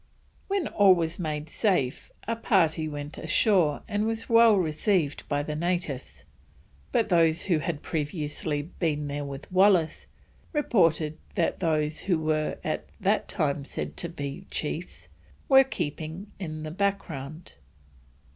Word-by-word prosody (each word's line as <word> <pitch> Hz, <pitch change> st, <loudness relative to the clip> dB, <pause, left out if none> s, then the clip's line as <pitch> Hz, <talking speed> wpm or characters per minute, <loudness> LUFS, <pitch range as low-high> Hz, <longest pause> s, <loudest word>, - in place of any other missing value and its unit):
When 390 Hz, -5 st, 0 dB
all 200 Hz, -3 st, +6 dB
was 165 Hz, 0 st, -2 dB
made 155 Hz, -3 st, -3 dB
safe, 160 Hz, -, 0 dB, 0.2 s
a 230 Hz, -, 0 dB
party 165 Hz, -8 st, +2 dB
went 145 Hz, 0 st, -6 dB
ashore 160 Hz, -2 st, +2 dB
and 210 Hz, 0 st, 0 dB
was 225 Hz, 0 st, -2 dB
well 230 Hz, -2 st, +6 dB
received 160 Hz, -2 st, 0 dB
by 145 Hz, 0 st, 0 dB
the 150 Hz, +1 st, -4 dB
natives, 170 Hz, -5 st, -3 dB, 0.7 s
but 235 Hz, -3 st, +1 dB
those 165 Hz, -2 st, +3 dB
who 175 Hz, -5 st, +2 dB
had 155 Hz, 0 st, -3 dB
previously 150 Hz, -1 st, -2 dB
been 150 Hz, -3 st, -2 dB
there 145 Hz, 0 st, -3 dB
with 140 Hz, +4 st, -8 dB
Wallis 185 Hz, -4 st, +3 dB, 0.5 s
reported 165 Hz, -, +2 dB, 0.2 s
that 175 Hz, -5 st, 0 dB
those 155 Hz, -3 st, 0 dB
who 185 Hz, -4 st, +1 dB
were 155 Hz, -1 st, 0 dB
at -, -, -2 dB
that -, -, +1 dB
time 140 Hz, -1 st, -1 dB
said -, -, -5 dB
to 170 Hz, -, -3 dB
be 140 Hz, -4 st, -6 dB
chiefs, 160 Hz, +3 st, -4 dB, 0.4 s
were 270 Hz, -1 st, +8 dB
keeping 170 Hz, -, -5 dB
in 155 Hz, -4 st, -5 dB
the 155 Hz, -, -5 dB
background. 165 Hz, -5 st, -3 dB
160 Hz, 135 wpm, -27 LUFS, 150-190 Hz, 0.7 s, were